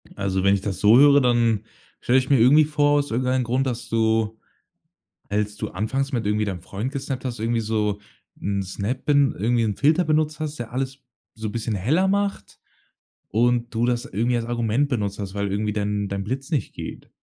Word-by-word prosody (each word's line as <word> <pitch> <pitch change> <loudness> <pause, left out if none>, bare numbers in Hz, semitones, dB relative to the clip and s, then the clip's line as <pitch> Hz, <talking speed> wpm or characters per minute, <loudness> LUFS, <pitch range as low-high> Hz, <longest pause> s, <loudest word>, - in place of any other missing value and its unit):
Also 95 -1 -1
wenn 100 0 +4
ich 100 - 0
das 95 -3 -4
so 110 +4 +6
höre, 145 0 +7
dann 115 -3 +2 0.4
stelle 125 +2 +3
ich 130 - -4
mir 135 -4 +4
irgendwie 145 +6 +6
vor 145 -1 +2
aus 145 - -3
irgendeinen 130 +2 +1
Grund, 130 +3 0
dass 120 -1 -4
du 110 -1 +1 0.9
als 105 0 -1
du 105 0 -4
anfangs 135 +9 -2
mit 115 -4 -1
irgendwie 105 +1 +1
deinem 95 -4 -4
Freund 105 +9 -5
gesnappt 135 -2 -4
hast, 120 -3 -4
irgendwie 115 +1 0
so 105 -2 -1 0.4
'n 100 0 -1
Snap 100 +7 -4
bin 145 -2 +3
irgendwie 115 +3 +1
'n 105 -3 -1
Filter 155 +5 +3
benutzt 155 0 0
hast, 155 -1 -4
der 120 -1 -6
alles 135 +1 -3 0.4
so 110 -1 -5
bisschen 115 0 -3
heller 155 - +1
macht 200 - -2 0.7
und 120 +2 +1
du 115 +2 +2
das 120 +1 0
irgendwie 120 +3 0
als 115 - -3
Argument 120 +3 0
benutzt 105 -6 -2
hast, 100 -1 -5
weil 100 -1 -2
irgendwie 105 +1 -1
dein 105 -1 -1
dein 100 0 -3
Blitz 135 - -4
nicht 145 - -1
geht. - - -8
115 Hz, 200 wpm, -23 LUFS, 105-135 Hz, 0.9 s, höre